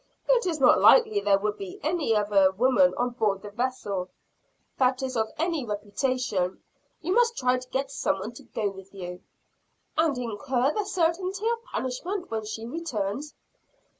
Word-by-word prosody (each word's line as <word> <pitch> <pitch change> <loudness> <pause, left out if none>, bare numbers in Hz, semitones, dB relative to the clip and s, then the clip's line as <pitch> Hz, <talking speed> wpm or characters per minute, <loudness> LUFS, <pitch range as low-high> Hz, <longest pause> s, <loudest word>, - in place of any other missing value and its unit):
"It 480 -5 +3
is 325 -4 -1
not 265 - +6
likely 440 -4 +6
there 200 - +3
would 210 +1 -2
be 195 -2 -7
any 305 -7 +1
other 205 -2 +4
woman 255 +6 +3
on 245 0 0
board 210 -5 0
the 205 - -8
vessel 205 -6 -2 0.7
that 255 0 +2
is 260 -1 -3
of 220 -1 0
any 330 -3 0
reputation. 210 -2 -2 0.4
You 360 +4 0
must 470 +1 +3
try 255 0 +2
to 250 0 -13
get 270 +1 -2
some 275 - 0
one 200 +4 -5
to 245 +4 -13
go 225 -3 -2
with 195 0 -13
you." 180 -1 -7 0.8
"And 315 -5 +3
incur 250 +3 0
the 420 - -1
certainty 370 +3 0
of 465 0 -1
punishment 345 - -4
when 220 -1 -2
she 220 +1 -5
returns?" 260 -2 -4
250 Hz, 165 wpm, -27 LUFS, 210-320 Hz, 0.8 s, not